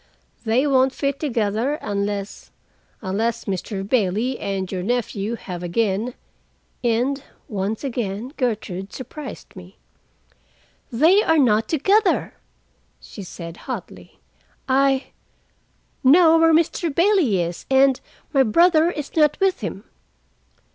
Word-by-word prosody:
They 235 +5 +2
won't 265 -2 +3
fit 275 0 -2
together, 230 -1 0
unless—unless 205 0 -5
Mr. 195 0 -4
Bailey 225 +2 0
and 195 -2 -3
your 185 -2 -3
nephew 225 0 -2
have 180 -6 -7
again—" 210 +6 -1 0.7
And 245 +4 0 0.3
once 205 +3 -3
again 240 -1 -4
Gertrude 205 -7 -3
surprised 270 +1 -9
me. 185 0 -13 1.1
"They 320 - +5
are 325 -5 +2
not 225 -6 +3
together," 385 +6 +2 0.7
she 205 - -11
said 170 -2 -9
hotly. - - -7 0.5
"I—know 275 +4 +1
where 325 0 +5
Mr. 330 +1 +1
Bailey 335 - +3
is, 170 0 -4
and 265 -1 +4 0.3
my 275 - +5
brother 330 +7 +4
is 295 -5 -6
not 300 -2 +3
with 385 -1 +2
him." 200 -3 -5
245 Hz, 105 wpm, -22 LUFS, 200-290 Hz, 1.1 s, They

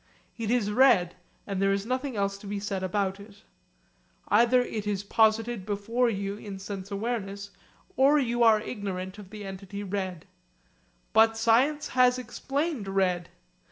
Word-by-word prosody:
It 225 -2 -4
is 230 -4 +1
red, 210 -7 +4 0.3
and 195 -2 -3
there 195 0 +3
is 195 +1 -1
nothing 255 +1 -2
else 200 -1 -1
to 200 - -11
be 205 0 -3
said 200 -1 -3
about 195 +1 -1
it. 200 0 -14 0.9
Either 240 +4 +5
it 215 -4 -5
is 200 -1 -1
posited 220 +1 +2
before 220 +5 0
you 200 -1 -3
in 205 -2 -8
sense 195 0 -7
awareness 200 -2 -4 0.4
or 275 +3 +5
you 240 -4 0
are 225 -2 +6
ignorant 195 -3 -5
of 200 -3 -11
the 210 0 -8
entity 195 +1 -7
red. 190 -4 -4 0.9
But 225 0 +5
science 255 +7 +2
has 250 0 +4
explained 270 -1 -3
red. 185 -3 0
205 Hz, 155 wpm, -27 LUFS, 195-235 Hz, 0.9 s, are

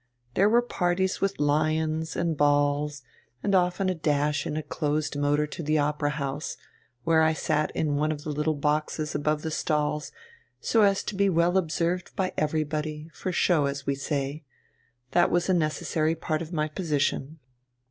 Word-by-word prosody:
There 200 +8 +4
were 240 +2 +4
parties 185 -4 0
with 195 0 0
'lions' 155 +2 +1
and 165 -2 0
balls, 145 0 +1 0.4
and 200 - +1
often 180 +1 +2
a 185 - +2
dash 150 -2 0
in 150 - -3
a 155 - -2
closed 150 -1 -1
motor 145 +1 +2
to 150 - -7
the 155 0 +1
Opera 145 0 +1
House, 145 0 -3 0.5
where 160 +1 +4
I 160 0 +4
sat 155 -1 0
in 150 -2 0
one 155 +1 +1
of 150 -1 -5
the 155 - -3
little 150 +1 0
boxes 150 +1 -1
above 150 +1 0
the 160 - -3
stalls, 150 -1 -1 0.5
so 225 - +2
as 200 -1 +3
to - - -4
be 200 0 +3
well 170 0 +2
observed 175 0 0
by 185 -1 -1
everybody, 155 0 -2
for 185 - -4
show, 170 -4 +3
as 140 -1 -4
we 140 - +1
say. 140 +1 -3 0.7
That 175 -1 +4
was 175 +1 +1
a - - +4
necessary 155 -1 0
part 155 -1 -2
of 165 0 -6
my 155 -3 0
position." 150 -2 -1
155 Hz, 175 wpm, -27 LUFS, 150-170 Hz, 0.7 s, There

